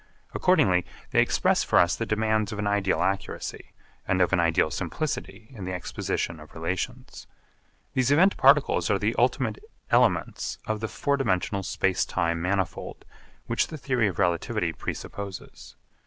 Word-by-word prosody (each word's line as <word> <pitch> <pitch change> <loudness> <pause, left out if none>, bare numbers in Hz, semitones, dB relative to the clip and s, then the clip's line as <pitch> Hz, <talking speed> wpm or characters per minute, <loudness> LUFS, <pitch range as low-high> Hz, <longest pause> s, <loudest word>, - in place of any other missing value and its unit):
Accordingly 95 - +3 0.3
they - - +5
express - - +2
for - - +2
us 85 - +4
the 115 - -3
demands 110 -1 +1
of 105 - -5
an 105 - -2
ideal 100 -1 +1
accuracy, 95 +1 -3 0.4
and 95 - +1
of 90 0 +2
an 95 - +4
ideal 80 -2 +2
simplicity 110 - -4
in 110 -7 -9
the 95 - -3
exposition 85 -2 -3
of 75 -1 -14
relations. 95 +10 -4 0.7
These 130 -1 +2
event 180 +7 +5
particles - - +4
are - - +3
the - - 0
ultimate - - +1 0.3
elements - - +2
of 110 -2 -2
the 110 - -2
four 140 +5 -1
dimensional 100 -5 0
space 95 0 0
time 85 -2 -1
manifold 95 0 -2 0.4
which 115 - 0
the 155 - -7
theory 130 -5 +1
of 95 - -4
relativity 85 -3 0
presupposes. 100 -2 -7
100 Hz, 155 wpm, -26 LUFS, 90-115 Hz, 0.7 s, they